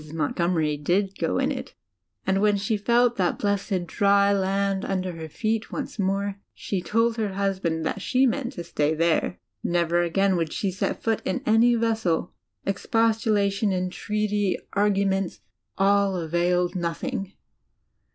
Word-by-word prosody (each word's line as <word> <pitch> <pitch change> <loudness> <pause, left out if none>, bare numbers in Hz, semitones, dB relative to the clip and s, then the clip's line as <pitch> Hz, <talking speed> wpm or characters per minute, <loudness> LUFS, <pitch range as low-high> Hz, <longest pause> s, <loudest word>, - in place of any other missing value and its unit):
Montgomery 160 0 0
did 190 +6 0
go - - 0
in - - +1
it; - - -6 0.5
and 195 +1 +1
when 210 -1 +3
she 200 +3 0
felt 235 +3 +2
that 180 -2 +1
blessed 200 -3 -1
dry 200 +2 +3
land 195 0 0
under 185 -1 -2
her 160 -2 -8
feet 220 +6 -2
once - - -5
more, 200 +1 -1 0.2
she 195 -3 -3
told 230 +4 +1
her 210 -3 -1
husband 190 -5 -1
that 200 - -2
she 255 +6 +2
meant 260 +1 -1
to 175 - -6
stay 155 -2 0
there. 165 +2 +1 0.3
Never 175 0 +1
again 190 +3 +2
would 165 -2 -1
she 195 - -1
set 185 - -3
foot 225 -1 +1
in 185 - -2
any 230 +2 +5
vessel. 225 -8 0 0.3
Exposmladon, 215 -1 +1
entreaty, 205 +2 -1 0.2
argument, 195 -2 +1 0.4
all 200 0 +3
availed 175 +2 0
nothing. 195 +4 -3
195 Hz, 140 wpm, -25 LUFS, 175-210 Hz, 0.5 s, any